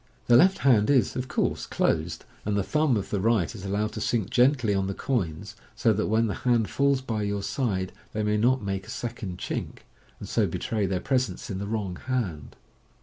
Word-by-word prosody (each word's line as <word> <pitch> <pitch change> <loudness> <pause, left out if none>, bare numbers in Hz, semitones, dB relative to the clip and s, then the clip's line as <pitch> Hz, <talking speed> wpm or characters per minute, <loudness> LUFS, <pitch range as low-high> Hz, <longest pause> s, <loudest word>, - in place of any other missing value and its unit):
The 120 - +5
left 190 +9 +6
hand 115 -5 +5
is, 135 -4 +3
of 130 0 -3
course, - - -1
closed, 80 0 -1 0.2
and 105 0 0
the 100 - +1
thumb 150 0 +2
of 100 - -5
the 100 - 0
right 110 -2 +1
is 105 -4 -9
allowed 105 +2 -1
to 110 - -5
sink 110 -3 0
gently 125 -4 +3
on 95 -1 0
the 100 - -3
coins, 90 - -2 0.2
so 115 - +3
that 105 +1 -1
when 110 +2 +2
the 105 - -1
hand 120 -4 +2
falls 140 -1 +2
by 115 -5 -3
your 100 -1 -2
side, 95 -9 -1 0.2
they 110 - -2
may 105 0 +1
not 125 +2 +2
make 95 -1 -3
a - - -12
second 110 -6 -5
chink, - - -5 0.4
and - - -7
so - - +1
betray 105 -3 -1
their 95 -1 -1
presence 130 -5 -1
in 95 - -3
the 100 - -4
wrong 100 -5 -3
hand. 100 - -2
105 Hz, 210 wpm, -26 LUFS, 100-125 Hz, 0.4 s, left